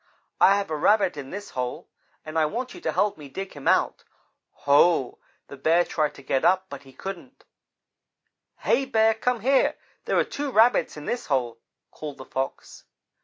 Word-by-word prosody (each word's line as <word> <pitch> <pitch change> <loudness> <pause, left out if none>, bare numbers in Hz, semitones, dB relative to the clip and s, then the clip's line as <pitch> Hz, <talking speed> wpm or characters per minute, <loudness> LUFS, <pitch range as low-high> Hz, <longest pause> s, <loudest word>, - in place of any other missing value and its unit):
I 195 - +6
have 200 -5 -3
a - - 0
Rabbit 185 +3 +3
in 140 -2 -7
this 205 +1 -7
hole, 125 -1 -4 0.4
and 155 0 -8
I 155 - +3
want 245 +9 -4
you 360 - -11
to - - -1
help 205 -6 0
me 145 -2 -10
dig 195 +7 -6
him 145 -2 -8
out.' - - +2 0.6
Ho! 145 -1 +4 0.3
The 140 - -10
Bear 165 +5 +3
tried 155 -2 -1
to 140 - -13
get 135 +1 0
up, 185 +2 +3
but 140 -1 -7
he 135 -1 -16
couldn't. 195 - -9 1.2
"'Hey, 275 - +2
Bear, 225 -3 +3
come 240 +1 -1
here 270 +4 +3 0.3
there - - 0
are - - +4
two 285 0 -4
Rabbits 230 - +3
in 150 - -8
this 245 0 -3
hole,' 120 -5 -1 0.3
called 150 -2 -8
the 130 - -10
Fox. 135 0 -5
170 Hz, 185 wpm, -25 LUFS, 140-220 Hz, 1.2 s, I